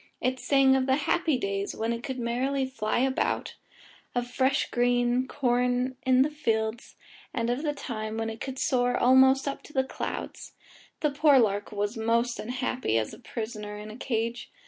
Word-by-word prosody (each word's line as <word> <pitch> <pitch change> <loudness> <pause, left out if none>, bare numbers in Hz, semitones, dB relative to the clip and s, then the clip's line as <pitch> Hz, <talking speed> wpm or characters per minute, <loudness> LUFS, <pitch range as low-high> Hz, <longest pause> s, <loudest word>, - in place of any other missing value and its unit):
It 255 +1 -1
sang 270 -1 +4
of 265 0 +1
the 265 - +4
happy 325 -5 +2
days 200 -3 -2
when 225 +1 -1
it 230 - -5
could 260 +1 -5
merrily 255 +3 0
fly 225 -5 -2
about, 265 0 0 0.6
of 245 0 0
fresh 260 +2 +1
green 245 +1 +2
corn 250 -2 0
in 260 0 +6
the 300 - -2
fields, 225 -6 -2 0.4
and 235 -1 0
of 245 +3 -1
the 300 -2 -1
time 220 -6 -5
when 225 0 -1
it 220 - -10
could 265 -1 -5
soar 245 -1 +1
almost 265 +2 +5
up 280 - -3
to 300 - -15
the 265 - +2
clouds. 265 - -6 0.5
The 300 - +2
poor 290 0 +5
lark 205 -4 +1
was 205 +2 -2
most 230 +2 +1
unhappy 250 - -1
as 110 -1 -1
a - - -11
prisoner 215 -3 -6
in 210 +1 -8
a - - -9
cage. 230 -1 -3
245 Hz, 180 wpm, -27 LUFS, 225-265 Hz, 0.6 s, in